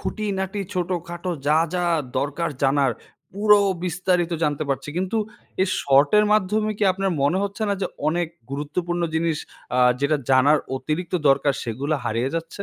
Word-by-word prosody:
খুঁটিনাটি 200 -2 -3
ছোটখাটো 175 -1 -3 0.2
যা, 150 +2 +4 0.2
যা, 180 - 0 0.3
দরকার 145 +4 -1
জানার, 135 -2 +3 0.4
পুরো 210 +1 +5 0.3
বিস্তারিত 180 -1 0
জানতে 150 -1 0
পারছি। 135 +1 -2
কিন্তু 190 +5 -1 0.5
এই 190 - +1
শর্টের 145 +10 +4
মাধ্যমে 215 +1 +1
কি 210 - +2
আপনার 195 0 -1
মনে 155 +7 +2
হচ্ছে 200 +2 -3
না 200 - +1
যে 185 - +1 0.2
অনেক 170 +1 0 0.2
গুরুত্বপূর্ণ 175 +5 -2
জিনিস 160 -1 +1 0.4
আ - - +2 0.2
যেটা 140 +2 +2
জানার 140 +4 +5 0.2
অতিরিক্ত 155 +8 -3
দরকার, 140 +1 +3
সেগুলা 135 +7 -2
হারিয়ে 120 +3 -1
যাচ্ছে? 165 +4 -5
170 Hz, 145 wpm, -23 LUFS, 145-190 Hz, 0.5 s, পুরো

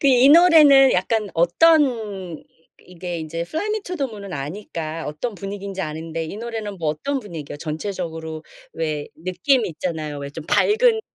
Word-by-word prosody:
그 280 - +1
이 260 +1 +6
노래는 300 -5 +7
약간 210 +3 0
어떤 295 - +5 0.6
이 - - -20 0.4
이게 175 -1 -6
이제 160 +1 -5
fly 320 - -3
me 430 0 -1
to 360 - -5
the 275 -4 -1
moon은 200 -4 -9
아니까 160 +1 -5
어떤 200 +10 -4
분위기인지 195 0 -5
아는데 160 +1 -4
이 160 - -7
노래는 220 -4 -5
뭐 160 - -1
어떤 265 - -2
분위기에요? 160 -9 -8
전체적으로 160 -1 -5 0.3
왜 155 -2 -3
느낌 185 - +1
있잖아요. 155 -3 -4
왜 140 - -6
좀 150 +2 -8
밝은 440 - +3
185 Hz, 375 characters per minute, -22 LUFS, 160-250 Hz, 0.6 s, 노래는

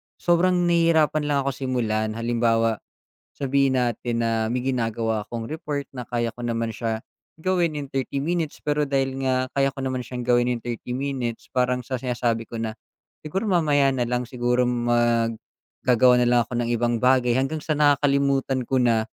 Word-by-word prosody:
sobrang 175 +1 +2
nahihirapan 165 -3 +3
lang 145 -1 +2
ako 140 - 0
simulan. 110 -5 -1
Halimbawa, 115 -1 +1 0.5
sabihin 135 -1 +1
natin 120 0 -1
na 115 0 0
may 125 - -1
ginagawa 115 -3 -1
akong 115 -1 -6
report 145 -3 -4
na 125 - -5
kaya 120 -1 -1
ko 120 +1 -7
naman 115 -1 -1
siya 110 0 -3 0.4
gawin 175 -3 +1
in 145 -2 -5
30 135 0 -2
minutes 165 -1 -2
pero 150 0 0
dahil 135 -1 -1
nga 130 0 +1
kaya 135 0 +1
ko 135 - -7
naman 130 -2 -2
siyang 125 -1 -5
gawin 120 0 +3
in 125 -1 -1
30 120 +1 -5
minutes 130 -3 -3
parang 125 -1 +1
sa 130 - -2
sinasabi 120 -2 -1
ko 115 - -7
na, 110 -1 -3 0.5
"Siguro 190 +7 -2
mamaya 150 -7 +3
na 125 - 0
lang 125 0 -1
siguro 125 0 +1
mag 120 -1 +1 0.5
gagawa 125 0 +5
na 125 - +3
lang 120 - +4
ako - - -8
ng 120 - -2
ibang 120 0 +1
bagay," 125 -1 +4
hanggang 135 +4 -1
sa 155 - -1
nakakalimutan 140 -2 +2
ko 130 -1 +1
na. 115 -2 +2
125 Hz, 175 wpm, -24 LUFS, 120-140 Hz, 0.5 s, gagawa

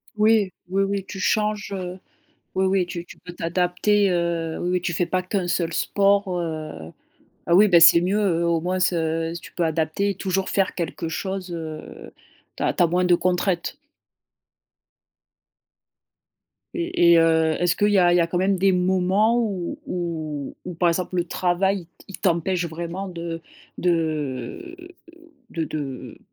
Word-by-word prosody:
Oui, 215 -2 +3 0.2
oui, 195 +2 +1
oui. 195 -1 -2
Tu 195 - -7
changes, 210 +1 0
heu, 185 -1 -5 0.6
oui, 190 0 +2
oui 190 -1 +2
tu 175 -1 -6
tu - - -14
peux 180 - -10
t'adapter, 180 +4 +1
heu, 170 -2 -1
oui, 175 - -1
oui 180 0 +1
tu 175 - -2
fais 175 +2 0
pas 185 +1 -1
qu' 185 - -10
1 180 -2 -1
seul 170 -1 0
sport, 200 +3 +2
heu, 155 - -6 0.5
ah 170 - +1
oui, 205 +3 +7
bah 175 -4 +6
c'est 170 +1 +9
mieux 185 -2 +1
au 170 -1 +1
moins 180 +2 -1
s 185 - +2 0.5
tu - - -12
peux 175 - -1
adapter 160 +5 0
et - - -6
toujours 190 +1 -2
faire 195 -1 0
quelque 165 -1 -4
chose, 190 +1 -4
heu, 160 -2 -8 0.5
tu - - -3
as - - +1
tu - - +2
as - - +4
moins 180 +2 +1
de 180 -1 +5
contraintes. 180 0 -1 3.0
Et 340 - +2
et - - +6
heu, 160 -1 +3
est-ce 175 0 +2
qu'il 205 - +2
y 205 - +3
a 175 -2 +5
il - - +4
y - - +4
a 170 - +2
quand 175 - -2
même 190 +1 +2
des 195 +1 +3
moments 190 +5 +2
où 195 -7 -2
où 160 -5 -4
où 180 - -5
par 175 +1 +2
exemple 180 +2 -2
le 175 - +2
travail, 185 +3 0 0.2
il - - -18
il 195 - -8
t'empêche 175 0 0
vraiment 170 +4 -5
de 170 -2 -6 0.4
de 160 - -2 0.7
de 165 -6 -3
de 140 -5 -6
180 Hz, 175 wpm, -23 LUFS, 170-195 Hz, 3.0 s, c'est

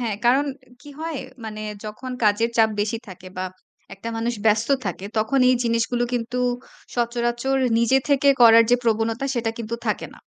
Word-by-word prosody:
হ্যাঁ। 225 -4 -2
কারণ 265 +4 +4 0.4
কি 290 - -12
হয়? 325 -3 -3 0.3
মানে 215 -1 -6 0.2
যখন 215 +5 -7
কাজের 215 +3 +3
চাপ 220 -1 +5
বেশি 220 +2 -1
থাকে 185 0 -10
বা 185 - -1 0.5
একটা 195 +4 -7
মানুষ 235 +1 -1
ব্যস্ত 220 +1 +3 0.2
থাকে 185 +1 -4
তখন 225 +5 +1
এই 255 - +4
জিনিসগুলো 230 +1 +1
কিন্তু 245 +1 -2 0.6
সচরাচর 240 +2 0 0.2
নিজে 235 +3 +4
থেকে 280 0 +3
করার 230 0 +8
যে 245 - +6
প্রবণতা 225 +2 0
সেটা 230 -2 0
কিন্তু 230 0 -4
থাকে - - -1
না। - - -17
230 Hz, 170 wpm, -23 LUFS, 220-245 Hz, 0.6 s, করার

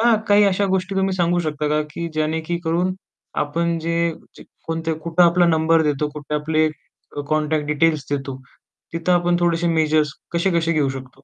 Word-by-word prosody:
त्या 235 0 +5
काही 205 0 +6
अशा 200 0 +2
गोष्टी 190 +1 -1
तुम्ही 190 0 +1
सांगू 175 0 +2
शकता 150 -2 -2
का 150 0 +1
की 170 +2 -4
ज्यणेक 160 +1 -2
करून 175 +3 0 0.5
आपण 165 +3 -1
जे 170 +1 0 0.5
कोणते 165 0 -2
कुठं 165 +2 +1
आपला 175 0 +5
नंबर 160 0 +3
देतो, 150 0 0
कुठे 150 0 -6
आपले 155 +1 +1 0.6
कॉन्टॅक्ट 155 -1 0
डिटेल्स 150 -1 +1
देतो 135 -2 -3 0.6
तिथं 165 +2 0
आपण 175 0 +2
थोडेसे 170 0 +1
मेजर्स 155 -2 +2 0.2
कसे 170 +3 +1
कसे 165 0 0
घेऊ 150 -4 +1
शकतो? 130 -1 -6
165 Hz, 165 wpm, -21 LUFS, 150-175 Hz, 0.6 s, काही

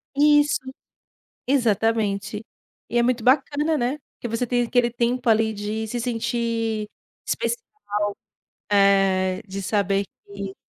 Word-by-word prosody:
Isso, 295 0 +4 0.9
exatamente. 220 -4 +1 0.5
E 240 - 0
é 235 - +4
muito 245 -2 +1
bacana, 295 +4 +2
né? 250 +3 -1 0.2
Porque - - -6
você 230 +2 -1
tem 245 0 +2
aquele 240 0 +2
tempo 240 +1 0
ali 220 0 +3
de 215 +2 -3
se 240 +2 -3
sentir 230 -2 -1 0.4
especial, 470 -1 -1 1.1
eh, 195 -1 +3
de 195 +1 -5
saber 200 0 +1 0.2
que 200 -1 -7
225 Hz, 120 wpm, -23 LUFS, 200-245 Hz, 1.1 s, Isso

